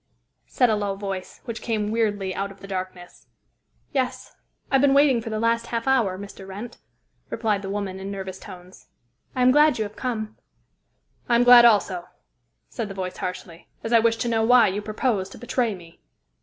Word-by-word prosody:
said 250 - +2
a 220 - +2
low 205 -1 -2
voice, 195 -2 -6
which 230 -2 -6
came 215 -3 -2
weirdly 205 -4 0
out 200 +1 -3
of 195 - -15
the 195 - -11
darkness. 185 -2 -7 0.6
"Yes. 260 -2 -3 0.4
I - - +3
have 265 - +4
been 275 -1 +4
waiting 280 -4 +4
for 225 - -6
the 215 - -3
last 230 +1 +1
half 230 +1 -3
hour, 230 -9 +2
Mr. 200 -1 -10
Wrent," 205 +5 -8 0.5
replied 210 -3 -1
the 195 - -6
woman 195 -2 -4
in 195 +1 -6
nervous 190 -1 -6
tones. 185 -2 -13 0.5
"I 255 - +1
am 255 - +6
glad 295 0 +5
you 220 - 0
have 210 0 -8
come." 220 -4 -4 0.9
"I 235 - +4
am 235 - +4
glad, 245 -1 +9
also," 195 -6 +3 0.6
said 225 - -5
the 195 - -8
voice 185 -1 -5
harshly, 180 -2 -7 0.2
"as 225 - -2
I 230 - +7
wish 230 0 +2
to 235 - -2
know 225 -1 +1
why 235 -2 +6
you 200 +2 -3
propose 210 -2 -1
to - - -12
betray 240 -1 -1
me." 170 -2 -16
215 Hz, 195 wpm, -24 LUFS, 195-235 Hz, 0.9 s, glad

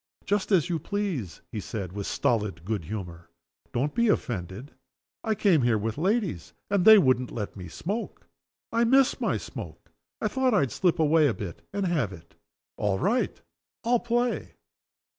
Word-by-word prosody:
"Just 205 +1 0
as 180 -6 +4
you 170 -3 -1
please," 175 - -3
he 110 - -4
said, 95 -3 -5
with 100 -1 -4
stolid 105 - 0
good 105 -5 -2
humor. 90 -3 -7 0.4
"Don't 135 +5 -1
be 235 0 +2
offended. 110 - -2 0.5
I 220 -2 0
came 195 -7 +4
here 120 -2 +3
with 110 +1 -2
ladies 185 - -1 0.2
and 200 -3 +2
they 220 0 +10
wouldn't 130 -8 +3
let 105 -4 -5
me 90 -3 -8
smoke. 200 - -5 0.5
I 230 +1 +2
miss 265 +3 +4
my - - +1
smoke. - - -9 0.3
I - - 0
thought 260 -3 +1
I'd 140 -10 +2
slip 180 -3 +1
away 155 -1 +4
a 120 - 0
bit 95 -5 -7
and 200 -1 -1
have 150 - 0
it. 85 -3 -13 0.4
All 100 -2 +1
right! 235 - 0 0.4
I'll 240 0 +3
play." 240 +1 -1
145 Hz, 165 wpm, -27 LUFS, -, 0.5 s, they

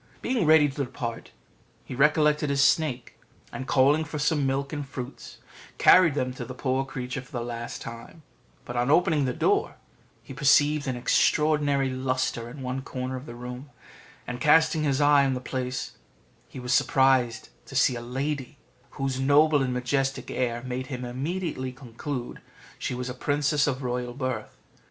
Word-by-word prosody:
Being 235 -10 0
ready 155 -1 +6
to 140 0 -3
depart, 120 -3 -6 0.6
he - - -7
recollected 150 +2 +3
his 140 0 +3
snake, 140 -5 +1 0.3
and, 130 - -6
calling 145 +4 +4
for 155 -1 -6
some 150 -1 +1
milk 140 +1 -2
and 145 -1 -3
fruits, 135 -1 -8 0.4
carried 170 -6 +6
them 130 -3 -1
to 125 - -6
the 125 +2 -8
poor 130 0 0
creature 130 -1 -5
for 130 +4 -19
the 120 -4 -3
last 120 0 -6
time; 115 +8 -10 0.4
but 120 - -7
on 120 +2 +1
opening 155 -2 +3
the 130 - 0
door - - +1 0.5
he - - -10
perceived 145 +1 +3
an 130 - -1
extraordinary 145 +1 +2
lustre 130 -2 -2
in 135 +2 -9
one 130 +1 -3
corner 130 0 -5
of 130 +2 -8
the 120 - -8
room, 125 +3 -8 0.6
and 120 0 -6
casting 160 +1 +4
his 140 -1 +1
eye 145 -1 +5
on 135 -1 +1
the - - -3
place 125 0 -4 0.6
he - - -10
was 125 0 -1
surprised 130 -3 +2 0.2
to - - -10
see 125 - +3
a 120 - -5
lady, 135 +3 -4 0.4
whose 135 -2 -2
noble 145 +2 +4
and 130 -1 0
majestic 135 +2 -1
air 120 -2 -2
made 130 0 -4
him 125 -2 -5
immediately 135 +1 -3
conclude 125 0 -6 0.4
she - - -3
was 125 0 -4
a 125 - -4
princess 145 +3 +1
of 135 -1 -2
royal 125 0 -3
birth. 130 -5 -4
135 Hz, 170 wpm, -26 LUFS, 125-145 Hz, 0.6 s, ready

